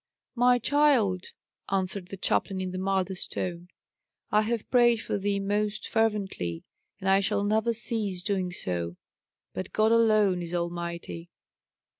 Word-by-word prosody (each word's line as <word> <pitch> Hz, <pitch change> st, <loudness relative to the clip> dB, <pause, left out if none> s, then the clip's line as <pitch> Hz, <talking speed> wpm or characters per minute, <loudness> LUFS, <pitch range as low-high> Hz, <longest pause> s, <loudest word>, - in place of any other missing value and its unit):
"My 245 Hz, 0 st, +4 dB
child," 245 Hz, -8 st, +2 dB, 0.5 s
answered 190 Hz, -1 st, -1 dB
the 195 Hz, -, -8 dB
chaplain 190 Hz, +1 st, 0 dB
in 185 Hz, -1 st, -3 dB
the 185 Hz, -, -4 dB
mildest 190 Hz, -1 st, -1 dB
tone, 175 Hz, -1 st, -4 dB, 0.6 s
"I 210 Hz, -, +4 dB
have 225 Hz, 0 st, -2 dB
prayed 240 Hz, -2 st, +5 dB
for 205 Hz, -, -3 dB
thee 200 Hz, 0 st, 0 dB
most 205 Hz, +1 st, -1 dB
fervently, 195 Hz, -, -1 dB, 0.4 s
and 190 Hz, -, -4 dB
I 195 Hz, 0 st, +5 dB
shall 200 Hz, +1 st, +1 dB
never 220 Hz, +3 st, +2 dB
cease 215 Hz, -5 st, 0 dB
doing 190 Hz, -3 st, 0 dB
so 85 Hz, -, -3 dB, 0.6 s
but 95 Hz, -, -6 dB
God 215 Hz, +1 st, +3 dB
alone 215 Hz, -5 st, +4 dB
is 170 Hz, 0 st, -4 dB
Almighty." 170 Hz, 0 st, -4 dB
195 Hz, 140 wpm, -27 LUFS, 180-220 Hz, 0.6 s, prayed